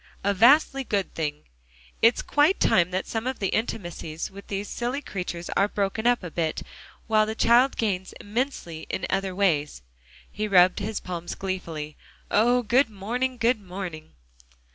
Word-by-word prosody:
"A 200 +1 +2
vastly 270 +6 +5
good 200 -5 -2
thing. 150 -2 -3 0.6
It's 230 +1 +4
quite 295 +6 +3
time 175 -1 +3
that 185 +1 -2
some 225 +2 -3
of 260 - -2
the 195 - -1
intimacies 175 -8 -3
with 200 +1 -12
these 200 +1 -3
silly 245 +3 -2
creatures 180 -8 -5
are 200 - +2
broken 205 +3 -1
up 245 -4 +3
a 175 - -6
bit, 160 -2 -2 0.4
while 215 -1 +3
the 220 - -3
child 240 +4 +4
gains 190 -4 -1
immensely 205 - -4
in - - -2
other 195 -1 -1
ways." 150 - 0 0.5
He 215 +1 -3
rubbed 185 -1 +5
his 210 +1 -3
palms 175 -1 -5
gleefully. 165 -6 -5 0.3
"Oh! 245 +3 +3
good 240 +3 +3
morning, 245 +6 -2
good 230 -1 +2
morning!" 180 -4 -7
200 Hz, 160 wpm, -25 LUFS, 180-235 Hz, 0.6 s, vastly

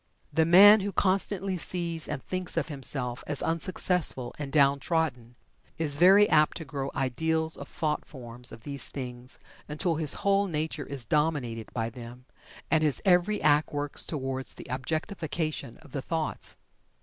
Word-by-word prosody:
The 160 +2 +3
man 200 +6 +8
who 200 +1 -3
constantly 195 0 +1
sees 170 -2 -1
and 150 -2 -5
thinks 185 -2 -2
of 165 -1 -1
himself 135 -3 -3
as 145 -2 +2
unsuccessful 165 -6 0
and 140 -2 -5
down 140 -1 +4
trodden 135 -7 -2 0.4
is 150 -3 0
very 195 +4 +7
apt 150 0 +3
to 160 - -7
grow 140 -1 -4
ideals 160 +5 +1
of - - -9
thought 150 -3 -2
forms 125 -3 -4
of 115 - -12
these 140 -1 -3
things 125 -2 -7 0.3
until 160 +2 -1
his 155 -3 +4
whole 200 0 +3
nature 155 -3 -3
is 135 -4 -4
dominated 130 -6 -1
by 115 -1 -3
them, 120 +1 -11 0.5
and 160 - +3
his 150 -3 +2
every 185 +3 +3
act 150 0 +3
works 145 -1 -1
toward 135 -3 -3
the - - -7
objectification 155 - -3
of 145 - -17
the 135 - -4
thoughts. 160 +2 -3
150 Hz, 160 wpm, -28 LUFS, 135-165 Hz, 0.5 s, man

